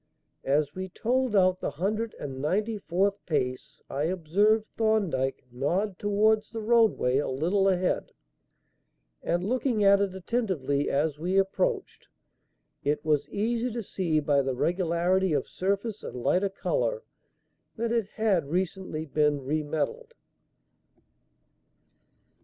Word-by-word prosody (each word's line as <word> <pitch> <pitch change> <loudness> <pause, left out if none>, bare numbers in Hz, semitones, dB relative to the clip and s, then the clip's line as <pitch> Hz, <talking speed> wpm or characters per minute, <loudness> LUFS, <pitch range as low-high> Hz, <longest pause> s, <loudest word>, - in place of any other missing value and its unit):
As 145 +1 +2
we 190 0 -5
told 245 +4 0
out 185 -1 +4
the - - -2
hundred 210 +9 -2
and 135 -2 -6
ninety 210 +8 0
fourth 195 +3 0
pace 130 -6 -2
I 140 +2 -2
observed 190 +6 +2
Thorndyke 195 -14 0
nod 180 - -1
towards 215 +1 +2
the 225 - -5
roadway 220 - +3
a - - -1
little 180 +9 +1
ahead, 185 -1 0 1.1
and, 175 +1 0
looking 245 -1 +1
at 200 0 +6
it 195 -2 -1
attentively 180 - -1
as 150 +1 0
we 180 +4 0
approached, 390 - 0 0.8
it 150 +2 -1
was 150 -2 +1
easy 230 +4 -1
to 230 0 -4
see 170 -5 0
by 145 -1 +2
the 135 -1 -2
regularity 175 +3 +1
of 140 - 0
surface 200 +3 -2
and - - -7
lighter 195 +2 +2
colour, - - -1 0.7
that 230 0 -2
it 230 -4 +1
had 195 -10 +1
recently 180 -2 -2
been 150 -2 +1
re 155 +3 0
metalled. 450 - -3
190 Hz, 130 wpm, -27 LUFS, 150-215 Hz, 1.1 s, at